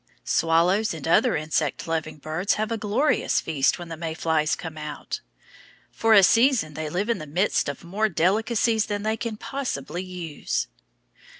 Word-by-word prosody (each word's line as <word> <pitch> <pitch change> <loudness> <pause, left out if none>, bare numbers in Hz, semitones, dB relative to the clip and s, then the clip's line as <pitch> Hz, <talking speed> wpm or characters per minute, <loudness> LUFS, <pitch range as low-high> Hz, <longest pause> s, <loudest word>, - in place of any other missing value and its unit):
Swallows 170 +5 +2
and 160 -1 -6
other 165 - +4
insect 155 -1 -1
loving 160 -1 -2
birds 160 +7 -1
have 215 +1 -2
a 230 - 0
glorious 220 +9 +1
feast 145 -4 +1
when 175 -1 -8
the 165 - -5
May 160 0 -4
flies 160 -2 +1
come 165 -2 -7
out. 150 -1 -6 0.7
For 225 -1 +3
a 200 - +8
season 230 - +4
they 155 +1 -4
live 185 +7 -1
in 235 - 0
the 155 - -7
midst 175 0 +1
of 140 - -6
more 205 +6 0
delicacies 220 +5 +1
than 205 -1 -3
they 220 +1 0
can 225 -1 -4
possibly 255 -9 -4
use. 180 -5 -3
180 Hz, 170 wpm, -25 LUFS, 155-215 Hz, 0.7 s, a